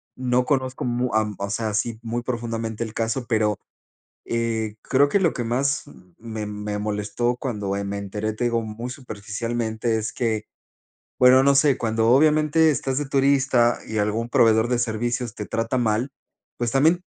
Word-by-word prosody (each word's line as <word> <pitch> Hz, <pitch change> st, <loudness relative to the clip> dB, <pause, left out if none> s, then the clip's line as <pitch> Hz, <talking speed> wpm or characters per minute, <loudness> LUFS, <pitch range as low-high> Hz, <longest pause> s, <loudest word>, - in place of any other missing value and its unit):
No 125 Hz, 0 st, +1 dB
conozco 130 Hz, -2 st, -1 dB
mu 125 Hz, +1 st, -1 dB
a 110 Hz, -1 st, +1 dB
o 100 Hz, -, -3 dB
sea, 110 Hz, +2 st, -1 dB
así, 110 Hz, +2 st, -2 dB
muy 120 Hz, +1 st, -2 dB
profundamente 115 Hz, -2 st, -3 dB
el 110 Hz, -1 st, -7 dB
caso, 115 Hz, +3 st, -2 dB
pero, 110 Hz, -3 st, +1 dB, 0.7 s
eh, 115 Hz, -2 st, -1 dB
creo 140 Hz, +2 st, +3 dB
que 200 Hz, -, +2 dB
lo 175 Hz, -5 st, +2 dB
que 120 Hz, -, -3 dB
más 135 Hz, +6 st, 0 dB, 0.3 s
me 110 Hz, -2 st, -5 dB
me 105 Hz, 0 st, -4 dB
molestó 105 Hz, +4 st, -1 dB
cuando, 105 Hz, -7 st, -3 dB
eh, 100 Hz, -, -3 dB
me 100 Hz, 0 st, -3 dB
enteré, 105 Hz, +2 st, -3 dB
te 115 Hz, -, -2 dB
digo 115 Hz, -1 st, +1 dB
muy 110 Hz, +3 st, -6 dB
superficialmente 115 Hz, -1 st, -3 dB
es 110 Hz, -1 st, -3 dB
que 110 Hz, -3 st, -1 dB, 0.7 s
bueno, 130 Hz, +1 st, +7 dB
no 140 Hz, 0 st, +5 dB
sé, 140 Hz, -1 st, +4 dB
cuándo 115 Hz, 0 st, +1 dB
obviamente 155 Hz, +3 st, +4 dB
estás 135 Hz, -2 st, -1 dB
de 145 Hz, -, -2 dB
turista 135 Hz, -3 st, +3 dB
y 110 Hz, -, -3 dB
algún 105 Hz, +3 st, 0 dB
proveedor 115 Hz, -1 st, +4 dB
de 125 Hz, -, +1 dB
servicios 120 Hz, 0 st, -2 dB
te 105 Hz, -, -5 dB
trata 115 Hz, +3 st, -1 dB
mal, 115 Hz, +2 st, 0 dB, 0.5 s
pues, 120 Hz, -1 st, -1 dB
también 160 Hz, +6 st, +3 dB
115 Hz, 170 wpm, -23 LUFS, 110-130 Hz, 0.7 s, bueno